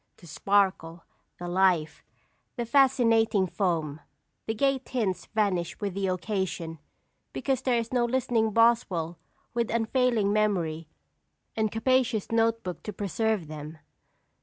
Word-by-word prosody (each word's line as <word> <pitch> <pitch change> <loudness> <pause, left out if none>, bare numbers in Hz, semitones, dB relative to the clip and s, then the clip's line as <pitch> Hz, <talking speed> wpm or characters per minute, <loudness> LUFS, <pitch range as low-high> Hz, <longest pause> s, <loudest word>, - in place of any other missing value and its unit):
The - - -16
sparkle, 185 -2 0 0.3
the 175 - -6
life, 175 -4 +1 0.5
the 240 - -3
fascinating 230 -6 +3
foam, 165 -6 -1 0.5
the 220 - -1
gay 275 +2 +2
tints 215 -9 -3
vanish 200 -6 -1
with 200 -3 -3
the 195 0 -1
occasion, 185 -4 -3 0.5
because 265 -2 -1
there 255 -2 +1
is 230 +1 -3
no 245 -1 +2
listening 240 -2 +1
Boswell 200 -7 +2 0.3
with 235 -1 -1
unfailing 230 -2 +1
memory 175 -7 0 0.7
and 220 -1 0
capacious 230 -2 +1
note 230 0 +2
book 180 -1 -6
to 210 - -6
preserve 205 0 -1
them. 155 +1 -8
210 Hz, 125 wpm, -27 LUFS, 180-235 Hz, 0.7 s, fascinating